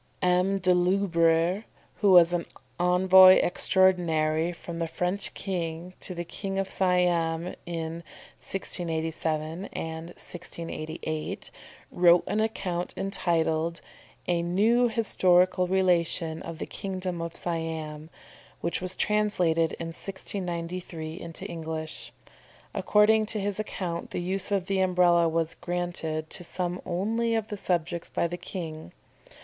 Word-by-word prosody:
M. 180 Hz, +2 st, +3 dB
de 185 Hz, -1 st, +3 dB
la 180 Hz, -, +3 dB
Loubère, 170 Hz, 0 st, +2 dB, 0.3 s
who 205 Hz, -, +3 dB
was 175 Hz, -2 st, +7 dB, 0.5 s
Envoy 185 Hz, +1 st, +7 dB
Extraordinary 170 Hz, -4 st, +2 dB
from 170 Hz, 0 st, -8 dB
the 165 Hz, -, -1 dB
French 180 Hz, +4 st, -2 dB
King 175 Hz, -2 st, -4 dB
to 180 Hz, -, -3 dB
the 175 Hz, -, -3 dB
King 195 Hz, +3 st, -5 dB
of 195 Hz, 0 st, 0 dB
Siam 175 Hz, -2 st, +1 dB
in 165 Hz, -2 st, -3 dB, 0.5 s
1687 160 Hz, -1 st, -2 dB
and 160 Hz, 0 st, -5 dB
1688, 165 Hz, -3 st, -5 dB, 0.4 s
wrote 175 Hz, 0 st, +5 dB
an 210 Hz, -, -1 dB
account 195 Hz, -5 st, -2 dB
entitled 170 Hz, -3 st, 0 dB, 0.5 s
a 175 Hz, -1 st, +1 dB
"New 215 Hz, +8 st, +3 dB
Historical 185 Hz, -5 st, +3 dB
Relation 170 Hz, -3 st, +1 dB
of 165 Hz, -1 st, -7 dB
the -, -, -4 dB
Kingdom 185 Hz, -3 st, -4 dB
of 165 Hz, 0 st, -5 dB
Siam," 160 Hz, -2 st, -3 dB, 0.5 s
which 170 Hz, -, -2 dB
was 185 Hz, 0 st, -2 dB
translated 180 Hz, -6 st, +1 dB
in 165 Hz, -, -5 dB
1693 175 Hz, -2 st, -5 dB
into 165 Hz, -1 st, -8 dB
English. 160 Hz, -2 st, -5 dB, 0.6 s
According 210 Hz, +2 st, +4 dB
to 215 Hz, -1 st, 0 dB
his 200 Hz, 0 st, -2 dB
account 180 Hz, -5 st, -4 dB
the -, -, -3 dB
use 190 Hz, +2 st, -3 dB
of 195 Hz, -3 st, +1 dB
the 195 Hz, 0 st, 0 dB
Umbrella 180 Hz, -2 st, +4 dB
was 165 Hz, 0 st, 0 dB
granted 170 Hz, -3 st, -3 dB
to -, -, -3 dB
some 180 Hz, +1 st, -3 dB
only 225 Hz, +6 st, 0 dB
of 220 Hz, -1 st, -2 dB
the 205 Hz, -, -4 dB
subjects 170 Hz, -2 st, -1 dB
by -, -, 0 dB
the 170 Hz, +1 st, -2 dB
king. 160 Hz, -, -7 dB
175 Hz, 125 wpm, -27 LUFS, 165-190 Hz, 0.6 s, was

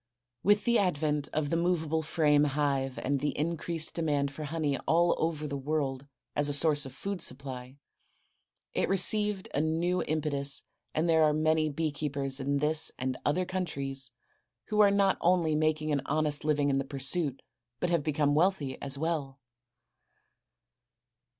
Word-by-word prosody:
With 205 Hz, +1 st, +3 dB
the 235 Hz, -1 st, +3 dB
advent 150 Hz, -6 st, 0 dB
of 150 Hz, -2 st, -1 dB
the -, -, +2 dB
movable 165 Hz, -2 st, 0 dB
frame 150 Hz, -2 st, +3 dB
hive 140 Hz, -2 st, -1 dB
and 140 Hz, +1 st, 0 dB
the 145 Hz, +2 st, -2 dB
increased 165 Hz, +1 st, -2 dB
demand 145 Hz, -4 st, 0 dB
for 150 Hz, +2 st, -6 dB
honey 150 Hz, -2 st, -1 dB
all 170 Hz, +2 st, +4 dB
over 160 Hz, -2 st, -1 dB
the 140 Hz, -1 st, -4 dB
world 140 Hz, -2 st, -2 dB, 0.3 s
as 145 Hz, 0 st, +2 dB
a -, -, 0 dB
source 145 Hz, -1 st, +3 dB
of -, -, -10 dB
food 195 Hz, +5 st, -5 dB
supply, 130 Hz, -1 st, -5 dB, 1.0 s
it -, -, 0 dB
received 200 Hz, +1 st, +2 dB
a 145 Hz, -, +1 dB
new 170 Hz, +3 st, 0 dB
impetus 145 Hz, -3 st, 0 dB, 0.3 s
and 160 Hz, +2 st, +1 dB
there 160 Hz, -1 st, +4 dB
are 155 Hz, -1 st, +4 dB
many 155 Hz, 0 st, +2 dB
bee 155 Hz, +1 st, -1 dB
keepers 140 Hz, -2 st, -3 dB
in 140 Hz, +1 st, 0 dB
this 150 Hz, +2 st, +3 dB
and 130 Hz, 0 st, -2 dB
other 180 Hz, +5 st, +1 dB
countries 140 Hz, -8 st, -3 dB, 0.6 s
who 210 Hz, -, 0 dB
are 205 Hz, -1 st, +7 dB
not 200 Hz, -1 st, +2 dB
only 175 Hz, -3 st, +3 dB
making 155 Hz, 0 st, +1 dB
an 140 Hz, -2 st, +1 dB
honest 150 Hz, -1 st, 0 dB
living 145 Hz, -2 st, +1 dB
in 135 Hz, -, +1 dB
the -, -, -1 dB
pursuit, 140 Hz, +1 st, -1 dB, 0.4 s
but 175 Hz, -, -1 dB
have 170 Hz, -3 st, +2 dB
become 145 Hz, -1 st, +1 dB
wealthy 155 Hz, -4 st, +1 dB
as 140 Hz, 0 st, -1 dB
well. 145 Hz, -3 st, -2 dB
150 Hz, 160 wpm, -29 LUFS, 140-165 Hz, 1.0 s, are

